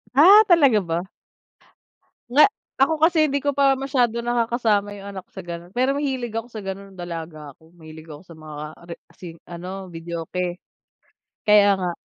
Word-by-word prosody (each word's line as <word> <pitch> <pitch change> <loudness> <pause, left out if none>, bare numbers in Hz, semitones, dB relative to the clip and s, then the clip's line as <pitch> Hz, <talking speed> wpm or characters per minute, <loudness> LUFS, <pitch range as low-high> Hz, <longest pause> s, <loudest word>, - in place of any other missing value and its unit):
Ah, 400 +9 +8
talaga 290 - +5
ba? 170 0 -3 1.3
Nga 295 +4 +6 0.4
ako 275 +4 +4
kasi 330 0 +4
hindi 280 0 -1
ko 285 - +1
pa 275 -1 +3
masyado 250 -4 0
nakakasama 230 -4 0
yung 200 0 -9
anak 190 -1 -9
sa 190 - -9
gano'n, 175 +1 -8
pero 255 +2 +2
mahilig 260 -5 -2
ako 225 +1 -3
sa 215 -3 -7
ganun 195 +1 -7
nung 185 - -17
dalaga 160 -4 -7
ako. 160 +1 -23
Mahilig 160 -1 -13
ako 150 0 -10
sa 170 -2 -14
mga 155 -1 -9 0.2
re 170 - -7 0.2
sin 170 -3 -10
ano, 185 +2 -7
videoke. 170 +2 -5 0.9
Kaya 210 -1 +6
nga. 180 -1 -1
195 Hz, 165 wpm, -22 LUFS, 170-255 Hz, 1.3 s, Ah